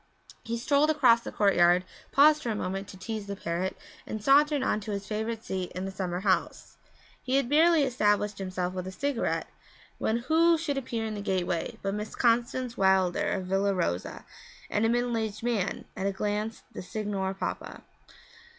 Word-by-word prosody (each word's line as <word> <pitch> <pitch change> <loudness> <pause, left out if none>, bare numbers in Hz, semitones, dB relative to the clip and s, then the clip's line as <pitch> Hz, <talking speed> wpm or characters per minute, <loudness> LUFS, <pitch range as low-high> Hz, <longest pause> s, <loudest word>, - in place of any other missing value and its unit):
He 230 0 -3
strolled 285 +5 +2
across 255 -7 +5
the - - -7
courtyard, 180 -3 +4 0.3
paused 300 +2 +6
for 240 - -3
a 220 - -1
moment 195 0 -3
to 190 - -11
tease 215 +2 -5
the 200 - -4
parrot, 180 +1 -3 0.3
and 215 - -4
sauntered 290 +1 +4
on 215 - +1
to 215 +1 -9
his 200 -1 -3
favourite 220 +2 -3
seat 185 -1 -3
in 185 +1 -4
the 195 - -4
summer 185 -2 -3
house. 190 -2 -1 0.4
He 255 +1 -1
had 275 -3 +2
barely 320 +3 +5
established 210 -5 +1
himself 185 -1 -3
with 185 0 -5
a - - -5
cigarette 280 +5 -1 0.5
when 220 - +1
who 325 +7 +3
should 295 -4 -2
appear 235 -4 -4
in 220 - -3
the 205 - -5
gateway 185 -4 -2
but 195 0 -1
Miss 210 +1 -5
Constance 240 +1 +1
Wilder, 190 -2 +2
of 190 -2 -2
Villa 195 +1 +1
Rosa, 90 - -2 0.5
and 210 +2 +2
a - - +1
middle 240 0 +1
aged 220 -1 -3
man 230 -6 -1
at 190 - -2
a - - +1
glance 210 +3 -3
the - - -6
Signor 195 0 -3
Papa. - - -5
210 Hz, 185 wpm, -28 LUFS, 190-245 Hz, 0.5 s, paused